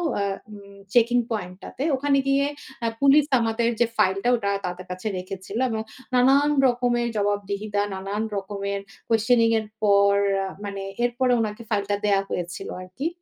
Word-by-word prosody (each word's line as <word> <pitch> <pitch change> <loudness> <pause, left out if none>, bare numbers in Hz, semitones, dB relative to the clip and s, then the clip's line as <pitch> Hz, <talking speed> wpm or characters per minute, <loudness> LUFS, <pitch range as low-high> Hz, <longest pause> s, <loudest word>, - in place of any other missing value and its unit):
অ্যা 200 0 0 0.2
উম 200 -1 -12 0.2
checking 240 0 +4
পয়েন্টটাতে 200 +5 -5
ওখানে 280 +1 +2
গিয়ে 275 +1 +3 0.4
অ্যা 230 - +1
police 280 +1 +6
আমাদের 230 +1 +1
যে 240 - +5
ফাইলটা 195 +3 +2
ওটা 200 -3 -1
তাদের 180 +1 -5
কাছে 185 +4 -5
রেখেছিল 190 +3 -6
এবং 220 -1 -2 0.3
নানান 270 +4 +5 0.2
রকমের 240 -1 +1
জবাবদিহিতা, 205 0 -1
নানান 195 +3 -3
রকমের 200 0 -3 0.3
কোয়েসশনিং 230 +1 +3
এর 215 - -6 0.2
পর 200 -1 +5 0.5
মানে 200 -1 -5 0.2
এরপরে 245 +1 +1
উনাকে 215 +1 -3
ফাইলটা 205 -1 0
দেয়া 200 -1 +3
হয়েছিল 180 +2 -4
আর 185 - -9
কি 290 +5 0
210 Hz, 145 wpm, -24 LUFS, 200-240 Hz, 0.5 s, police